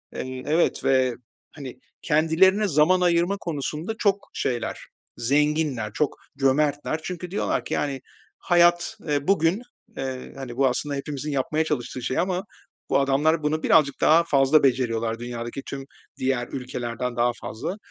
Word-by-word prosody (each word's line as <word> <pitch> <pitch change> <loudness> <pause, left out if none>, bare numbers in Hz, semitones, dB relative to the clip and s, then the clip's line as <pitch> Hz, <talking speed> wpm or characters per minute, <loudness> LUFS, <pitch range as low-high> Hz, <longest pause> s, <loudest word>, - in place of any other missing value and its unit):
Eee, 130 0 -5
evet 160 +3 +1
ve, 130 -2 +2 0.4
hani, 140 -4 -9 0.2
kendilerine 175 +7 +3
zaman 170 +3 +3
ayırma 175 +2 +2
konusunda 160 +4 -4
çok 200 -1 +1
şeyler 120 -2 -2 0.4
zenginler, 145 -4 0
çok 150 +2 0 0.2
cömertler 145 +3 +1
çünkü 180 0 -6
diyorlar 205 - -1
ki, - - -4
yani, 140 -3 -1 0.4
hayat, 175 +3 +3
ııı, 145 -2 -2
bugün, 190 +3 +2 0.4
eee, 130 -1 -5
hani, 125 -3 -7
bu, 135 0 +4
aslında, 140 +3 -2
hepimizin 145 +1 -4
yapmaya 145 +3 0
çalıştığı 130 -4 -3
şey 130 - -1
ama 180 +1 0 0.5
bu - - +3
adamlar 150 +4 +2
bunu 155 +1 0
birazcık 145 -4 +3
daha 165 +2 +6
fazla 140 -1 +4
beceriyorlar, 115 -3 +1
dünyadaki 120 +2 -5
tüm 135 -1 -6 0.3
diğer 130 -2 -1
ülkelerden 125 -1 -4
daha 120 +1 +2
fazla. 180 - -5
145 Hz, 140 wpm, -24 LUFS, 130-165 Hz, 0.5 s, daha